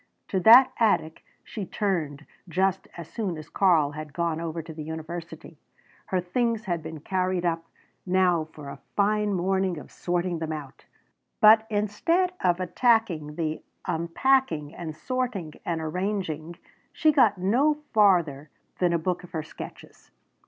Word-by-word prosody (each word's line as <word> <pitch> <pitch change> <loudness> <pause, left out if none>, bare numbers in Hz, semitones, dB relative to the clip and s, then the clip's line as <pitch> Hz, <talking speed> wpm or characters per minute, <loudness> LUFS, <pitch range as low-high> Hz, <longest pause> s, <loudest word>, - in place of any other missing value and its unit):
To 190 - 0
that 240 +7 +8
attic 200 -8 +1 0.2
she 210 - -6
turned 165 -7 -2 0.2
just 190 +2 0
as 170 -2 -7
soon 190 -3 -3
as 155 - -10
Karl 165 -7 +3
had 150 -1 -8
gone 165 -1 -1
over 165 0 -4
to 160 0 -9
the 155 - -7
university. 160 0 -7 0.5
Her 185 - 0
things 230 +5 -1
had 175 -4 -2
been 160 -1 -8
carried 185 0 -1
up; 165 -1 -1 0.4
now 180 -3 +2
for 150 -2 -11
a - - -9 0.2
fine 210 +1 +2
morning 190 0 0
of 150 - -10
sorting 175 -1 -2
them 160 -1 -3
out! 145 -4 -8 0.5
But 220 +1 +7
instead 225 - +1
of 175 -1 +2
attacking 185 -6 +1
the 155 -1 -2 0.2
unpacking 170 - +1
and 160 -3 -6
sorting 240 -9 -3
and 170 -1 -1
arranging 170 -1 -3 0.4
she 310 - +3
got 235 -9 +4
no 245 +12 +2 0.2
farther 170 - +3 0.3
than 175 -2 +2
a - - +3
book 180 +2 -2
of 180 - -14
her 160 -2 -2
sketches. 155 - -11
175 Hz, 150 wpm, -26 LUFS, 160-205 Hz, 0.5 s, that